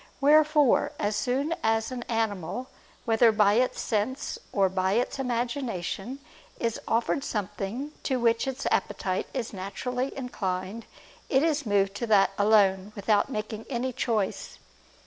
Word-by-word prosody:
Wherefore 300 -1 +4
as 205 +1 -1
soon 270 +8 0
as 225 +2 +1
an 250 -1 -4
animal, 225 0 -1 0.4
whether 230 0 +5
by 210 -2 +4
its 250 +3 +1
sense 230 +5 -2
or 195 -2 +3
by 190 0 0
its 245 +4 0
imagination, 240 -3 -2 0.4
is 230 -1 -1
offered 235 +5 +1
something 210 +4 -4
to 260 -3 -1
which 230 +2 +2
its 265 +1 -4
appetite 185 -1 -1
is 245 -5 -4
naturally 250 +7 -3
inclined, 200 -4 -4 0.4
it 265 +1 +3
is 300 -5 0
moved 200 -1 +2
to 235 - -3
that 205 -3 +5
alone, 200 -1 +3
without 205 +3 +2
making 215 -2 -5
any 255 0 -2
choice. 220 -5 -2
225 Hz, 135 wpm, -27 LUFS, 205-255 Hz, 0.4 s, whether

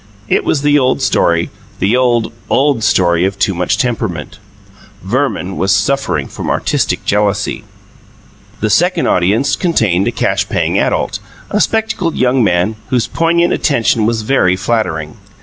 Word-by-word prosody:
It - - +1
was 140 - 0
the 145 0 +4
old 130 0 +1
story 85 -10 +1 0.3
the 100 +5 +1
old, 120 -3 +1 0.2
old 135 -4 +2
story 85 -3 +2
of 95 +1 -1
too 100 0 +1
much 90 0 -1
temperament: 110 - -3 0.6
Verman 95 +1 -2
was 95 +1 +1
suffering 135 - 0
from - - -6
artistic - - -1
jealousy. 105 -1 0 1.0
The - - 0
second - - +2
audience 100 +9 +1
contained 110 - +1
a - - +1
cash - - -1
paying - - 0
adult, - - -1 0.3
a 210 - +1
spectacled 215 -7 -1
young 125 0 +2
man 95 +2 +1
whose 125 -3 +1
poignant 170 +1 +1
attention 115 -5 +1
was 115 -1 -1
very 105 -7 +2
flattering. 90 -7 -2
110 Hz, 145 wpm, -14 LUFS, 95-135 Hz, 1.0 s, the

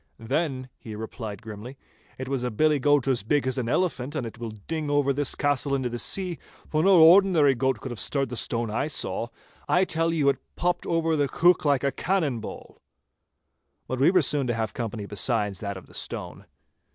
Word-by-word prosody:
'Then,' 130 +2 -2
he 110 -2 -8
replied 110 0 -7
grimly, 110 +4 -9 0.4
'it 130 - -6
was 135 -1 -1
a 125 - -1
billy 150 +6 +2
goat 145 0 +3
as 130 -5 +2
big 140 +7 0
as 130 0 0
an 120 -2 -2
elephant, 145 -4 -1
and 135 -6 -2
it 115 0 -9
will 115 -1 -5 0.2
ding 160 -2 -3
over 145 -1 +2
this 145 0 0
castle 145 -1 0
into 130 -2 -1
the 120 0 -4
sea, 180 +1 -1 0.3
for 155 - 0
no 190 0 +6
ordinary 170 -4 +6
goat 130 -1 0
could 130 - -7
have 120 - -6
stirred 135 -3 0
the 125 - -5
stone 115 -1 0
I 120 +7 -1
saw; 125 -5 -2 0.4
I 180 +2 +4
tell 165 -1 0
you 155 -4 +1
it 140 - 0 0.2
popped 175 0 -1
over 165 -1 +1
the 145 -2 +1
heuch 175 +5 +3
like 140 -3 +2
a 140 - +1
cannon 160 -10 -1
ball.' 110 - -10 1.1
But 130 - -3
we 135 - +5
were 180 -2 +4
soon 140 0 +2
to 120 - 0
have 110 -1 -1
other - - -17
company 115 -3 -4
besides 105 -1 0
that 100 -2 -4
of 95 - -11
the - - -19
stone. - - -6
135 Hz, 215 wpm, -26 LUFS, 120-155 Hz, 1.1 s, no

